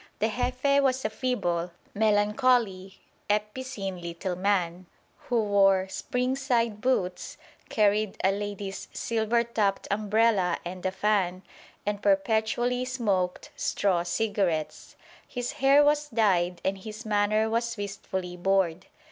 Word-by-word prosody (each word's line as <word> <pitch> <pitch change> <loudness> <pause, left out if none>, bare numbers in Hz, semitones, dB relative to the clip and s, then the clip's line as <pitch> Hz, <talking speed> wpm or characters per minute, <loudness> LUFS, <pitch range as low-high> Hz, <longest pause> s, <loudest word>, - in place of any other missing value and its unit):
The 220 - +1
Jefe 255 +4 +1
was 260 -2 +1
a 215 - 0
feeble, 180 -9 -1 0.2
melancholy, 210 -2 +1 0.3
epicene 210 -3 -2
little 170 +2 -4
man, 185 -2 0 0.4
who 235 -2 +2
wore 195 -2 +4
spring 250 +5 -1
side 235 -5 0
boots, 185 -8 -1 0.3
carried 210 -1 +2
a 190 - +4
lady's 200 -1 -5
silver 230 +1 0
topped 210 -4 -1
umbrella 210 -3 +2
and 180 +1 -6
a - - -1
fan, 190 -2 0 0.4
and 205 0 -2
perpetually 220 +5 +1
smoked 205 -8 -1
straw 190 -4 +1
cigarettes. 175 -3 -1 0.3
His 245 -1 -4
hair 275 +2 +5
was 295 0 +2
dyed 185 -7 +1
and 195 0 0
his 215 +3 -8
manner 215 +1 +2
was 230 +1 -1
wistfully 190 -3 -5
bored. 185 -1 0
205 Hz, 120 wpm, -27 LUFS, 190-235 Hz, 0.4 s, hair